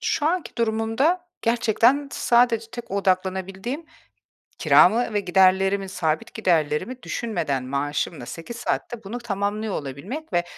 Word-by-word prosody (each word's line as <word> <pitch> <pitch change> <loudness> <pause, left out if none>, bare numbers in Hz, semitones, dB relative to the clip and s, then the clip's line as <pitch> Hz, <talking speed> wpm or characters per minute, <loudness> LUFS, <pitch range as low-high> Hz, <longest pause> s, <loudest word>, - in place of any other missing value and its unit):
Şu 295 - 0
anki 345 -2 -1
durumumda 230 +10 +1 0.2
gerçekten 235 +4 +2
sadece 235 -2 +3
tek 240 - -8
odaklanabildiğim, 190 - -1 0.7
kiramı 225 +5 +5
ve 205 - +2
giderlerimi, 190 +1 +3
sabit 160 -4 -2
giderlerimi 175 - 0
düşünmeden 165 - -2
maaşımla 140 +1 -2
8 165 - -8
saatte 235 0 -3
bunu 215 +5 -5
tamamlıyor 210 -1 -2
olabilmek 185 - -6
ve 175 0 +2
205 Hz, 115 wpm, -24 LUFS, 180-240 Hz, 0.7 s, kiramı